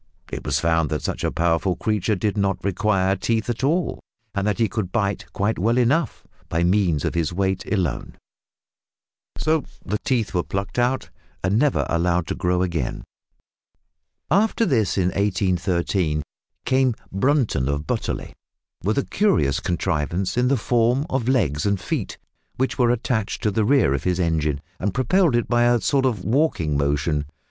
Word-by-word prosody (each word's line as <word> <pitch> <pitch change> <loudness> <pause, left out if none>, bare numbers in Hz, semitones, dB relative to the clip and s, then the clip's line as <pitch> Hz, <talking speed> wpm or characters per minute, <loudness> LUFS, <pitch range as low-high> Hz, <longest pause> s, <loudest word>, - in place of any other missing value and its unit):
It - - -5
was - - 0
found 80 -2 +1
that 75 -2 -2
such - - -3
a - - 0
powerful 85 +2 +1
creature 105 0 0
did 100 +2 -1
not 100 -1 0
require 95 -1 +1
teeth 115 +2 -1
at 120 +2 -5
all, 165 +6 +1 0.3
that 100 +1 0
he 115 - +2
could 100 -2 -3
"bite" 100 -3 -1
quite 105 +1 -1
well 115 +6 +2
enough 130 +3 +1 0.2
by 85 +1 0
means 90 -5 +2
of - - -1
his 85 -2 0
weight 95 +1 -1
alone, 90 - -1 1.2
so 155 -1 +1 0.2
the 105 +2 -1
teeth 120 -5 -1
were 90 - +2
plucked 95 +6 -3
out 125 +2 0 0.3
and 95 +4 +2
never 145 0 +2
allowed 85 0 +1
to - - -3
grow 90 0 +1
again. 85 -8 -2 1.3
After 220 +5 +3
this, 115 - +1
in 90 -1 +2
1813, 90 -4 0 0.4
came 130 -2 +2 0.2
Brunton 105 - +1
of 70 +1 -2
Butterley, - - -3 0.5
with 105 +7 0
a 140 - +1
curious 185 - +2
contrivance 85 +2 -1
in 125 +1 +2
the 135 +1 +2
form 120 +4 +2
of 130 -3 -1
legs 80 - +1
and 100 -1 +1
feet, - - -3 0.4
which 130 +1 -1
were 120 -2 +4
attached 110 -3 -1
to 105 - +2
the 105 +1 +1
rear 115 - +4
of 70 - -3
his 90 0 +1
engine 80 -4 0 0.2
and 100 +2 -2
propelled 140 +4 +3
it 120 - +1
by 120 0 +3
a 120 0 +4
sort 135 +2 +2
of 110 -7 -2
walking 110 - +1
motion. 75 +1 0
100 Hz, 165 wpm, -23 LUFS, 85-120 Hz, 1.3 s, were